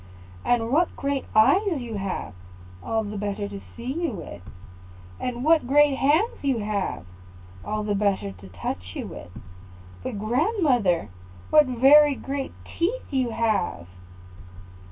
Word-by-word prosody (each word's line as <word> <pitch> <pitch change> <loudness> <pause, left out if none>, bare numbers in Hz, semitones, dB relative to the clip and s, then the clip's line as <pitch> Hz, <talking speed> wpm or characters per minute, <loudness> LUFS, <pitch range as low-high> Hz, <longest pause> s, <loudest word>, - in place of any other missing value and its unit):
"And 235 -1 +1
what 330 +5 +2
great 280 -1 -2
eyes 335 - +4
you 240 -3 -6
have!" 195 - -4 0.5
"All 225 -1 -1
the 205 -1 -5
better 205 0 -3
to 200 -1 -8 0.2
see 245 +3 -4
you 330 - +1
with." 170 - -8 0.8
"And 245 0 -3
what 315 -3 +4
great 290 +1 +5
hands 310 - +2
you 270 -3 +1
have!" 205 - -2 0.6
"All 215 0 -2
the 210 0 -1
better 200 - 0
to 95 0 -13
touch 90 0 -6
you - - -4
with." 85 - -9 0.7
"But, 205 - -5
grandmother, 245 - +1 0.4
what 300 -2 +6
very 275 +4 +6
great 275 0 -4 0.3
teeth 415 +9 -1
you 260 -3 +1
have!" 220 - -1
235 Hz, 135 wpm, -25 LUFS, 205-285 Hz, 0.8 s, what